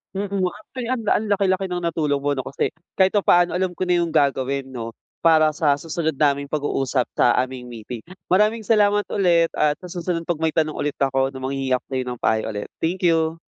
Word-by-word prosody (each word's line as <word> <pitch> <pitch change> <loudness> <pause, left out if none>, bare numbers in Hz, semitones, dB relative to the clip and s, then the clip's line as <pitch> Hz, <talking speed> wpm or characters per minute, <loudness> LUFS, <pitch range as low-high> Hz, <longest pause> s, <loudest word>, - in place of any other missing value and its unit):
Mm. 200 -1 -2
Actually, 235 +4 -8
ang 255 -2 -1
ang 220 - +2
laki-laki 195 -1 +2
ng 180 - -1
natulong 150 -4 0
mo 145 +1 0
'no, 130 - -3
kasi 135 - -1 0.3
kahit 190 +2 +4
papaano 175 -3 +4
alam 185 0 0
ko 180 +1 -3
na 180 - +3
yung 170 - -3
gagawin 140 -2 +1
'no 120 -3 -6 0.3
para 155 -2 +5
sa 145 -2 +2
susunod 160 +1 -2
naming 140 -1 +1
pag-uusap 135 -4 0
sa 120 - +4
aming 125 -1 -4
meeting. 115 0 -8 0.3
Maraming 215 +4 +2
salamat 205 -1 +3
ulit 170 -4 +3
at 150 0 +2
sa 180 - -9
susunod 175 -1 -3
'pag 170 -2 -2
may 160 -1 +2
tanong 155 0 0
ulit 145 -1 -3
ako 135 -1 +1
'no 130 - -8
manghihingi 135 -1 -3
ako 125 - +1
sa'yo 130 -1 -2
ng 125 -1 -6
payo 110 0 +1
ulit. 105 -1 -5 0.2
Thank 180 +2 +1
you! 165 0 +1
160 Hz, 205 wpm, -22 LUFS, 135-180 Hz, 0.3 s, para